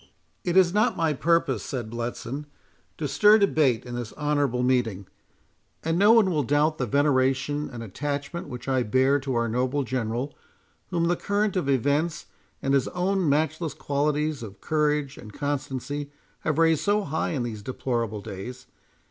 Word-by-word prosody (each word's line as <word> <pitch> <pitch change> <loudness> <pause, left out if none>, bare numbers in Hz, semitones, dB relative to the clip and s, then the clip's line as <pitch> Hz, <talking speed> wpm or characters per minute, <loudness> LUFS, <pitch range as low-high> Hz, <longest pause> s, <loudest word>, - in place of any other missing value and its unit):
"It 175 0 +1
is 180 -2 +5
not 215 +4 +2
my 165 -3 +2
purpose," 165 -1 +1
said 120 -5 -5
Bletson, 120 +4 -4 0.5
"to 150 - -2
stir 210 +9 +6
debate 155 - +2
in 120 - -7
this 120 -2 -5
honourable 145 -4 0
meeting; 120 -6 +1 0.8
and 165 +2 0
no 205 +2 +7
one 220 -5 +5
will 155 -3 +1
doubt 145 +4 +1
the 125 - 0
veneration 140 +2 +1
and 120 -2 -7
attachment 145 - -4
which 125 -1 -8
I 130 -1 +2
bear 130 +5 +3
to 135 -2 -3
our 115 0 +1
noble 130 +5 0
General, 125 +2 -3 0.5
whom 170 -2 0
the 175 +1 +2
current 205 +2 0
of 175 -7 0
events, 145 +5 +1 0.4
and 135 - +1
his 135 -2 +3
own 185 -1 0
matchless 155 +1 0
qualities 150 0 -1
of 105 -4 -9
courage 150 -2 0
and 105 - -10
constancy, 145 +1 -3 0.3
have 155 -1 -1
raised 165 -2 +4
so 205 +1 +2
high 160 0 -2
in 135 -5 -1
these 110 -3 -5
deplorable 115 -2 -2
days. 100 +6 -8
145 Hz, 165 wpm, -26 LUFS, 125-160 Hz, 0.8 s, no